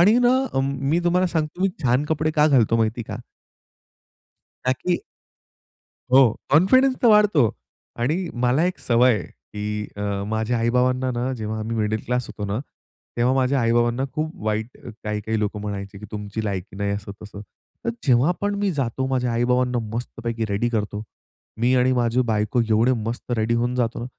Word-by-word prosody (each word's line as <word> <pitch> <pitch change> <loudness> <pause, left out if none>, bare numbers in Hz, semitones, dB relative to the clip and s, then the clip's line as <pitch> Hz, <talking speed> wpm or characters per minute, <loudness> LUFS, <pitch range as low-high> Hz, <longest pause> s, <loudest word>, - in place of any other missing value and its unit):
आणि 210 +7 +6
ना 245 +1 +4 0.2
अ, 135 - +2
मी 140 +4 0
तुम्हाला 180 +1 +3
सांगतो, 160 -1 -2
मी 195 - +4 0.2
छान 125 +3 +3
कपडे 155 0 0
का 150 0 +5
घालतो 120 -6 +4
माहिती 115 +1 0
आहे - - -4
का? - - -7 1.5
ता 130 - +3
की 175 +7 -1 1.1
हो. 130 -3 +7 0.2
कॉन्फिडन्स 255 - +5
तर - - +6
वाढतो. 210 - +5 0.5
आणि 160 +10 0 0.2
मला 125 +6 +3
एक 180 - -1
सवय 125 +1 +4
आहे, 90 - -5
की 105 0 -6
अ, - - -4 0.3
माझ्या 110 +2 -1
आई-बाबांना 125 +2 +1
ना, 125 +2 -2
जेव्हा 110 -2 -4
आम्ही 110 +2 -3
मिडल 110 0 0
क्लास 125 0 -1
होतो 105 - -6
ना, 100 +3 -2 0.6
तेव्हा 120 +2 +3
माझ्या 135 +1 +2
आई-बाबांना 120 +2 +2
खूप 155 +1 -2
वाईट 110 +2 -2 0.3
काही-काही 105 +1 -2
लोकं 105 0 -2
म्हणायचे, 100 -1 -5
की 105 - -8
तुमची 105 +1 -5
लायकी 95 -2 -4
नाही, 100 0 -1
असं 100 0 -4
तसं. 105 -1 -9 0.4
तर - - +1
जेव्हा 130 +4 +4
पण 205 0 0
मी 200 -1 +1
जातो, 130 -4 -2
माझ्या 125 -2 0
आई-बाबांना 125 +1 +1 0.2
मस्तपैकी 115 -1 -3
रेडी 100 +4 0
करतो. 105 -2 -2 0.6
मी 120 +2 +3
आणि 125 0 +3
माझी 120 0 +2
बायको 110 +2 +1
एवढे 110 +3 +4 0.2
मस्त 120 +2 -5
रेडी 110 +1 +1
होऊन 120 +1 0
जातो 120 -2 -1
ना, 120 - -4
120 Hz, 175 wpm, -23 LUFS, 110-135 Hz, 1.5 s, हो